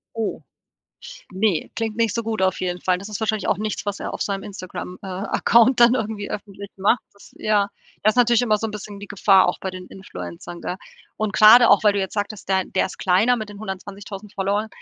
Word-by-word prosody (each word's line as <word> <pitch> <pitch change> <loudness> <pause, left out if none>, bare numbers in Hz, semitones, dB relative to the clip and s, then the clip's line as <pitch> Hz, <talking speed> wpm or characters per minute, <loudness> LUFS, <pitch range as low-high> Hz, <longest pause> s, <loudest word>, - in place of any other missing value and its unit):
Oh, 225 -2 -3 0.9
ne, 190 -3 0
klingt 225 -1 -2
nicht 230 -3 +1
so 230 - -1
gut 220 -2 -3
auf 185 -1 +1
jeden 180 -1 -3
Fall. 180 0 +1
Das 200 - -8
ist 210 0 -5
wahrscheinlich 215 -2 -1
auch - - +1
nichts, 215 0 -3
was 205 0 -3
er - - -4
auf - - -2
seinem 195 -1 -3
Instagram, 185 -2 -8
äh, 195 - -8
Account 230 +6 +2
dann 235 +1 +7
irgendwie 215 -4 -3
öffentlich 200 -1 -7
macht. 205 +5 +2
Das 200 - -18
ja, 205 -2 +1 0.3
das 215 +1 +4
ist - - -16
natürlich 240 -1 +4
immer 215 -3 +2
so 225 - -2
'n 220 - -6
bisschen 210 -1 -8
die 205 - -8
Gefahr 195 -2 +4
auch - - -2
bei 190 - -3
den 185 0 -9
Influencern, 90 - -9
gell? 180 - -3 0.4
Und 215 -2 -2
grade 230 +3 +8
auch, 205 +2 +5
weil 205 - +6
du 200 - -1
jetzt 190 -1 -3
sagtest, 205 -1 -4
der 190 -1 +2
der 190 - 0
ist - - -11
kleiner 200 +7 +3
mit 215 -3 -5
den 205 - -11
120.000 200 0 -8
Followern, 205 +3 -1
205 Hz, 225 wpm, -22 LUFS, 190-215 Hz, 0.9 s, grade